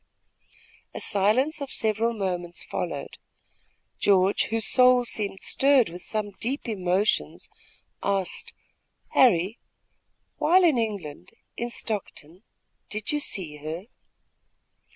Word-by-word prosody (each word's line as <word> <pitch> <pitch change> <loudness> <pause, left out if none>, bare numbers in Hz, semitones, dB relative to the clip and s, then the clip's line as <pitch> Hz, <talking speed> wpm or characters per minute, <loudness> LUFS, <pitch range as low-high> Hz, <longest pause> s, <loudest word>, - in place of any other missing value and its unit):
A - - -4
silence 250 +10 +2
of 280 - -4
several 225 +1 +1
moments 180 -4 -3
followed. - - -5 0.8
George, 195 0 +3
whose 225 -1 -1
soul 250 -1 +5
seemed 205 -4 -3
stirred 270 -5 +3
with 175 +2 -9
some 210 0 -2
deep 260 +4 -2
emotions, 195 -1 0 0.5
asked: 195 -2 -2 0.6
"Harry, 210 -4 +3 0.8
while 365 +3 +4
in 310 -8 +4
England, 185 -7 -5 0.2
in 240 +1 -3
Stockton, 195 -7 -5 0.5
did 215 0 -3
you 295 - 0
see 175 - -3
her?" 155 +4 -6
210 Hz, 105 wpm, -26 LUFS, 185-240 Hz, 0.8 s, soul